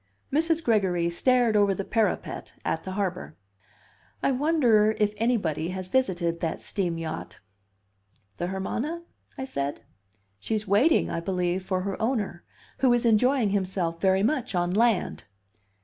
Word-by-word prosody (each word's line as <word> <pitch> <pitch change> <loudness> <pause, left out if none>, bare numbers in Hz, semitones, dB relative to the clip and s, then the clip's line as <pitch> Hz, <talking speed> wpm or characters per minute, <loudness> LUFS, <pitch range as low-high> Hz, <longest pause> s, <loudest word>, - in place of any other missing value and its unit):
Mrs. 325 +2 +1
Gregory 185 - +1
stared 245 +4 +2
over 200 -2 +4
the 195 - -4
parapet 220 -1 -1
at - - -1
the 190 - -4
harbor. 185 -5 -3 0.9
"I - - +3
wonder 250 -7 +3
if 210 -1 +1
anybody 200 -9 0
has 185 0 -5
visited 175 -10 0
that 165 - -2
steam 175 -5 -2
yacht?" 160 -1 -6 1.0
"The 175 - -2
Hermana?" 240 - -3 0.3
I 265 - -3
said. 140 - -3 0.6
"She's 215 - -3
waiting, 225 - +3
I - - -1
believe, 180 +1 -1
for 185 -1 -1
her 195 +2 -4
owner, 220 -7 -1 0.4
who 260 -2 +4
is 240 0 +1
enjoying 235 0 +3
himself 185 -4 -1
very 190 0 +3
much 250 -3 0
on 175 0 +1
land." 225 -2 +1
200 Hz, 140 wpm, -26 LUFS, 180-240 Hz, 1.0 s, over